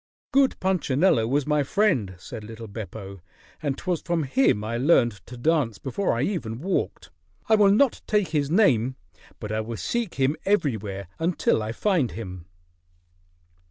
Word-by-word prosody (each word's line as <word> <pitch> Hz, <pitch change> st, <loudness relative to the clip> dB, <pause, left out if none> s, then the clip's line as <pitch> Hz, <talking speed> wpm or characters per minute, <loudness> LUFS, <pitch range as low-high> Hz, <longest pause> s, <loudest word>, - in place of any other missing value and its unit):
"Good 270 Hz, 0 st, +3 dB
Punchinello 165 Hz, -8 st, +2 dB
was 140 Hz, +3 st, +1 dB
my 150 Hz, -1 st, +2 dB
friend," 140 Hz, -, +1 dB
said 105 Hz, +4 st, -9 dB
little 115 Hz, +1 st, -9 dB
Beppo. 100 Hz, -2 st, -8 dB, 0.4 s
"And 140 Hz, -3 st, -2 dB
'twas 180 Hz, -3 st, -2 dB
from 170 Hz, -3 st, -1 dB
him 135 Hz, -, +2 dB
I 115 Hz, +2 st, -3 dB
learned 120 Hz, -, +3 dB
to 125 Hz, -, -9 dB
dance 145 Hz, -4 st, +1 dB
before 185 Hz, +9 st, -1 dB
I 125 Hz, -, +1 dB
ever 175 Hz, -, -3 dB
walked. 170 Hz, +12 st, -3 dB, 0.4 s
I 220 Hz, -, +3 dB
will 210 Hz, -2 st, +6 dB
not 230 Hz, +6 st, +3 dB
take 210 Hz, -3 st, +1 dB
his 145 Hz, -3 st, 0 dB
name, 130 Hz, -, +3 dB, 0.4 s
but 105 Hz, -, -6 dB
I 110 Hz, 0 st, 0 dB
will 115 Hz, +1 st, -5 dB
seek 230 Hz, -, -2 dB
him 135 Hz, +2 st, +1 dB
everywhere 110 Hz, -, -1 dB
until 165 Hz, -8 st, +1 dB
I 110 Hz, +1 st, -3 dB
find 165 Hz, -, 0 dB
him." 90 Hz, -6 st, -8 dB
135 Hz, 160 wpm, -25 LUFS, 110-185 Hz, 0.4 s, will